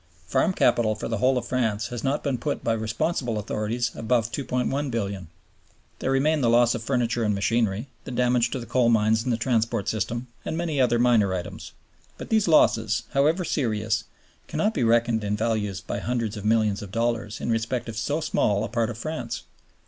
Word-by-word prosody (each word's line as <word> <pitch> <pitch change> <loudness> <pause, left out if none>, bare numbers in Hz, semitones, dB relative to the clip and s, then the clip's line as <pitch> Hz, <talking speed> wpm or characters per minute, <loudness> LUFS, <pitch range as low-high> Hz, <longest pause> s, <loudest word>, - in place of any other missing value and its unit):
Farm 80 - +2
Capital 110 -10 +2
for 110 - -5
the 115 -2 -2
whole 130 +2 +3
of 125 - -2
France 110 -5 -1
has 120 -2 -5
not 140 +2 0
been 135 -4 -1
put - - -3
by 115 - +1
responsible 115 +2 -1
authorities 110 +3 -2
above 115 0 0
$2,100,000,000. 125 - -2 0.7
There - - -2
remain 145 +3 +2
the 120 - +3
loss 120 0 +4
of 120 - -3
furniture 120 -1 0
and 105 -2 +1
machinery, 110 +2 0 0.2
the - - -8
damage 125 -1 +2
to 130 - -3
the 120 - -7
coal 125 -2 +2
mines 110 -1 +3
and 125 - -1
the 115 - +1
transport 115 -3 0
system, 115 +3 -2 0.2
and 160 - -3
many 160 -5 0
other 120 -2 +3
minor 115 -6 +3
items. 90 - -7 0.4
But - - -8
these 220 -3 +2
losses, 115 -8 +3
however 155 +6 +2
serious, 110 -6 -1 0.4
cannot 215 +1 0
be 125 - 0
reckoned 115 -1 +2
in 105 0 -1
value 110 -2 0
by - - -3
hundreds 115 -2 -2
of 105 -1 -7
millions 110 -2 +2
of 100 -2 -8
dollars 115 -1 -1
in 120 - -2
respect 115 +2 -1
of 115 - -6
so 145 +8 -1
small 105 -9 +1
a 110 - -3
part 115 -1 0
of 115 - -6
France. 120 -4 -4
115 Hz, 195 wpm, -25 LUFS, 110-125 Hz, 0.7 s, loss